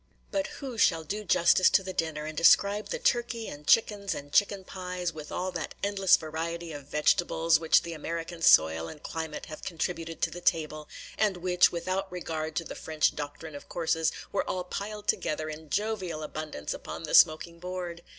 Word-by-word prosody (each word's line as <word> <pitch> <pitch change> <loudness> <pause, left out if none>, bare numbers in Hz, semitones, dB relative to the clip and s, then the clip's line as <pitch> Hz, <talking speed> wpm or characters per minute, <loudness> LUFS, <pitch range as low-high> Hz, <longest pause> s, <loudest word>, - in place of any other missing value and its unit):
But 290 +1 0
who 260 -5 -6
shall 165 -4 +3
do 205 +7 -4
justice 185 0 +5
to 190 - +3
the 190 0 -5
dinner, 155 -3 -2
and 155 0 -6
describe 200 +6 +4
the - - -2
turkey, 240 - 0
and 145 0 -9
chickens, 205 -3 +3
and 145 0 -9
chicken 200 -1 +3
pies, 180 -2 -4
with 150 -1 -9
all 185 +1 -2
that 165 -4 -5
endless 195 -2 +4
variety 165 +1 -5
of 145 -2 -9
vegetables 160 +1 +2
which 160 -1 +4
the 170 - -5
American 165 +2 -5
soil 80 - +5
and 150 - -11
climate 160 -2 -5
have 155 - -9
contributed 165 -1 -4
to - - +2
the 175 - -8
table, 155 -3 0 0.3
and 210 -4 +2
which, 180 0 +3
without 185 +3 -2
regard 160 -3 -4
to 175 - 0
the - - -7
French 155 -1 0
doctrine 145 +2 -6
of 145 - -10
courses, 160 -1 0 0.2
were 200 - -1
all 185 - -2
piled 205 +3 -6
together 155 +1 -1
in 155 0 -10
jovial 190 -5 -2
abundance 150 - -5
upon - - -7
the - - -5
smoking 170 +2 +5
board? 180 -1 -5
170 Hz, 185 wpm, -28 LUFS, 155-190 Hz, 0.3 s, justice